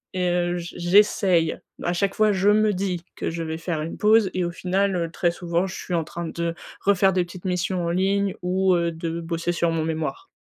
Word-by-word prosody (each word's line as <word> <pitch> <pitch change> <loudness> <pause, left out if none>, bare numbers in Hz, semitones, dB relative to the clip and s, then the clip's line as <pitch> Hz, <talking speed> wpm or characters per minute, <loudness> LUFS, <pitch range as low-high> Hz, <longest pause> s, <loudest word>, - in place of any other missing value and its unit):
et 180 -1 +1
heu, 175 0 +1
j'essaye, 175 -1 +2 0.3
à 175 - 0
chaque 195 +2 0
fois, 215 -1 +4
je 195 +1 +2
me 215 0 +3
dis 180 -2 -2
que - - -3
je 170 - -4
vais 160 0 -3
faire 165 -2 -3
une 160 - -5
pause 215 -1 +4
et 185 -1 +1
au 175 - -2
final, 190 +2 0
heu, 170 -2 -1
très 175 0 +1
souvent 175 +1 -1
je 190 - -7
suis 180 - -4
en 165 - +1
train 170 +1 -6
de 170 0 -2 0.3
refaire 195 -1 +3
des 180 0 +2
petites 175 +2 -12
missions 180 0 -1
en 170 - -1
ligne 195 +2 +1
ou, 185 +1 +2
heu, 170 -1 +1
de 165 0 -4
bosser 165 +1 -2
sur 170 -1 +1
mon 160 -1 0
mémoire. 160 - -3
175 Hz, 225 wpm, -24 LUFS, 170-190 Hz, 0.3 s, fois